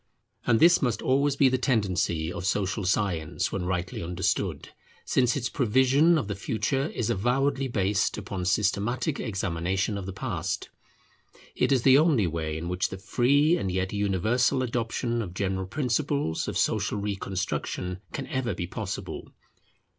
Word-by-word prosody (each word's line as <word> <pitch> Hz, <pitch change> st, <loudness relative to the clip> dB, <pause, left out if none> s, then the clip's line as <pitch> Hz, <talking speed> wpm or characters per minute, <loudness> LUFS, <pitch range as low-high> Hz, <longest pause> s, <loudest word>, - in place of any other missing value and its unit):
And 115 Hz, -2 st, +4 dB
this 175 Hz, +1 st, +6 dB
must 120 Hz, -5 st, 0 dB
always 140 Hz, +2 st, +2 dB
be 140 Hz, -, +5 dB
the 130 Hz, 0 st, +1 dB
tendency 90 Hz, -, 0 dB
of 85 Hz, -, -5 dB
social 95 Hz, +1 st, -1 dB
science 90 Hz, -5 st, 0 dB
when 95 Hz, -2 st, -2 dB
rightly 90 Hz, 0 st, -2 dB
understood, 90 Hz, +2 st, -2 dB, 0.4 s
since 125 Hz, -2 st, +2 dB
its 125 Hz, -3 st, -1 dB
prevision 130 Hz, +7 st, +3 dB
of 140 Hz, -, -2 dB
the 105 Hz, -, -2 dB
future 115 Hz, +7 st, -1 dB
is 120 Hz, -8 st, -2 dB
avowedly 135 Hz, +6 st, +1 dB
based 100 Hz, -4 st, 0 dB
upon 100 Hz, -3 st, -4 dB
systematic 105 Hz, -, 0 dB
examination 95 Hz, 0 st, -1 dB
of 95 Hz, -, -7 dB
the -, -, -3 dB
past. 95 Hz, -5 st, -3 dB, 0.9 s
It -, -, +1 dB
is 130 Hz, -3 st, +3 dB
the 135 Hz, +1 st, +7 dB
only 150 Hz, -, +3 dB
way 80 Hz, -2 st, -2 dB
in 85 Hz, +2 st, -5 dB
which 90 Hz, +1 st, -1 dB
the 95 Hz, -, -6 dB
free 140 Hz, -, +3 dB
and 95 Hz, -, -2 dB
yet 95 Hz, +1 st, -1 dB
universal 105 Hz, +6 st, +1 dB
adoption 120 Hz, 0 st, -1 dB
of 90 Hz, -5 st, -6 dB
general 95 Hz, -1 st, -2 dB
principles 140 Hz, -, -1 dB
of -, -, -2 dB
social -, -, +1 dB
reconstruction 95 Hz, -2 st, -3 dB
can 135 Hz, -, -4 dB
ever 125 Hz, -6 st, -2 dB
be 85 Hz, -, -3 dB
possible. 100 Hz, +2 st, -5 dB
105 Hz, 155 wpm, -27 LUFS, 95-130 Hz, 0.9 s, the